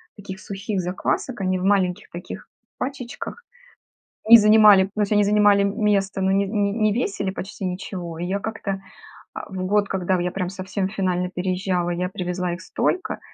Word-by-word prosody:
таких 195 Hz, -2 st, -9 dB
сухих 200 Hz, +1 st, -4 dB
заквасок. 190 Hz, +5 st, -2 dB
Они 185 Hz, 0 st, 0 dB
в 180 Hz, -, -4 dB
маленьких 190 Hz, -3 st, +1 dB
таких 175 Hz, +2 st, -8 dB, 0.3 s
пачечках 260 Hz, -, -6 dB, 0.8 s
и 230 Hz, +1 st, +11 dB
занимали, 210 Hz, -3 st, +7 dB
то 215 Hz, -, -2 dB
есть 205 Hz, 0 st, 0 dB
они 210 Hz, 0 st, +4 dB
занимали, 205 Hz, -1 st, +4 dB
место, 200 Hz, -2 st, 0 dB
но 190 Hz, -, +1 dB
не 200 Hz, +1 st, +2 dB
не 200 Hz, 0 st, 0 dB
не 215 Hz, -1 st, +1 dB
весили 200 Hz, -4 st, -1 dB
почти 195 Hz, +1 st, -7 dB
ничего. 180 Hz, -2 st, -5 dB
И 175 Hz, -, -3 dB
я 195 Hz, +2 st, -1 dB
как-то, 200 Hz, -3 st, -4 dB, 0.5 s
а, -, -, -7 dB
в 185 Hz, -1 st, -4 dB
год, 205 Hz, +1 st, +2 dB
когда 185 Hz, -1 st, 0 dB
я 180 Hz, +1 st, -1 dB
прям 185 Hz, -1 st, -3 dB
совсем 190 Hz, 0 st, -3 dB
финально 185 Hz, -3 st, -1 dB
переезжала, 180 Hz, -1 st, -1 dB
я 180 Hz, +1 st, -2 dB
привезла 180 Hz, -1 st, -3 dB
их 175 Hz, -, -7 dB
столько, 365 Hz, -, -2 dB
195 Hz, 170 wpm, -23 LUFS, 185-205 Hz, 0.8 s, и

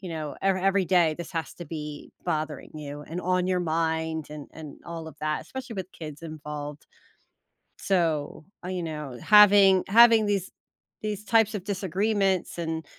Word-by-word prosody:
you 185 Hz, -, -7 dB
know, 155 Hz, -3 st, -5 dB
ever 195 Hz, -1 st, +3 dB
every 195 Hz, 0 st, +2 dB
day 170 Hz, -4 st, +3 dB
this 170 Hz, 0 st, -8 dB
has 165 Hz, -1 st, -3 dB
to 175 Hz, -, -9 dB
be 150 Hz, -1 st, -7 dB
bothering 155 Hz, -1 st, -3 dB
you, 145 Hz, -1 st, -7 dB
and 165 Hz, +4 st, -6 dB
on 180 Hz, 0 st, +1 dB
your 185 Hz, -1 st, +1 dB
mind, 160 Hz, -1 st, -1 dB
and 150 Hz, -2 st, -8 dB
and 155 Hz, -3 st, -10 dB
all 165 Hz, -1 st, -6 dB
of 150 Hz, -, -13 dB
that 155 Hz, 0 st, -1 dB
especially 260 Hz, -3 st, -7 dB
with 190 Hz, -2 st, -6 dB
kids 155 Hz, -1 st, -9 dB
involved, 150 Hz, -2 st, -7 dB, 0.9 s
so, 165 Hz, -6 st, 0 dB, 0.2 s
uh, -, -, -4 dB
you 185 Hz, -1 st, -3 dB
know, 150 Hz, -6 st, -6 dB
having 205 Hz, -3 st, +7 dB
having 225 Hz, +1 st, +7 dB
these 200 Hz, -2 st, -1 dB, 0.5 s
these 210 Hz, -1 st, -3 dB
types 225 Hz, 0 st, +3 dB
of 195 Hz, -4 st, -4 dB
disagreements, 195 Hz, -1 st, 0 dB
and 160 Hz, -1 st, -3 dB
170 Hz, 165 wpm, -26 LUFS, 155-195 Hz, 0.9 s, having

